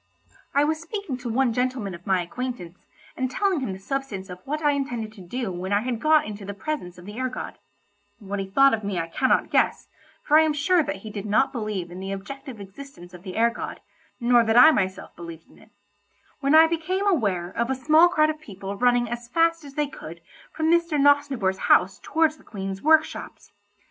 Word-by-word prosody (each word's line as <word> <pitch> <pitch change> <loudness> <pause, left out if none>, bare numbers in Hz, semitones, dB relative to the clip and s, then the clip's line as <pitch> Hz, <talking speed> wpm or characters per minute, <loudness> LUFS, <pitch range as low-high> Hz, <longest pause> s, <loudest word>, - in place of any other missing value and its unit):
I 285 - +5
was 315 +1 0
speaking 335 -4 -5
to 250 -1 -6
one 240 +1 +1
gentleman 250 -5 -2
of 170 +2 -12
my 185 -2 +2
acquaintance, 190 -4 -7 0.3
and 260 -1 -2
telling 380 +5 0
him 255 -7 -3
the 190 - -6
substance 200 -4 -5
of 180 - -8
what 305 +3 -3
I 295 - +4
intended 245 -6 -3
to 205 - -13
do 220 +4 -4
when 180 +2 -5
I 205 +1 +3
had 240 -1 -3
got 310 0 +4
into 210 -1 -7
the 200 0 -6
presence 200 - -5
of 175 - -13
the 210 +4 -8
air 255 0 -1
god 255 - -7 0.6
(what 200 -1 -5
he 195 - -3
thought 275 +7 +5
of 220 -1 -1
me 200 -2 -3
I 165 - -1
cannot 165 - +1
guess, - - +1 0.3
for 305 +1 +5
I - - +6
am 315 -1 +2
sure 325 +4 +2
that 195 - -3
he 215 - -6
did 205 0 -6
not 245 +6 +2
believe 215 -8 -4
in 180 - -8
the 190 +1 -5
objective 265 +5 -8
existence 195 -3 -12
of 180 - -11
the 185 -1 -8
air 230 +1 +3
god, - - -6 0.4
nor 240 -1 +4
that 225 +1 +2
I 315 +6 +9
myself 190 -8 -2
believed 170 -1 -10
in - - -20
it), - - -20 0.7
when 280 +2 +2
I 320 +1 +9
became 335 +4 -1
aware 200 - 0
of 235 +4 -2
a 265 - 0
small 310 +6 +5
crowd 310 -3 +3
of 310 0 -11
people 195 -6 -7
running 245 +1 +2
as 240 0 -6
fast 330 +4 +1
as 280 -1 -12
they 300 - +1
could 170 - -10 0.3
from 315 +1 0
Mr. 340 -3 +2
Nosnibor's 275 -9 +2
house 190 +2 +4
towards 315 -1 +1
the - - -20
Queen's 195 -2 -6
workshops. 315 0 +1
245 Hz, 220 wpm, -24 LUFS, 195-295 Hz, 0.7 s, I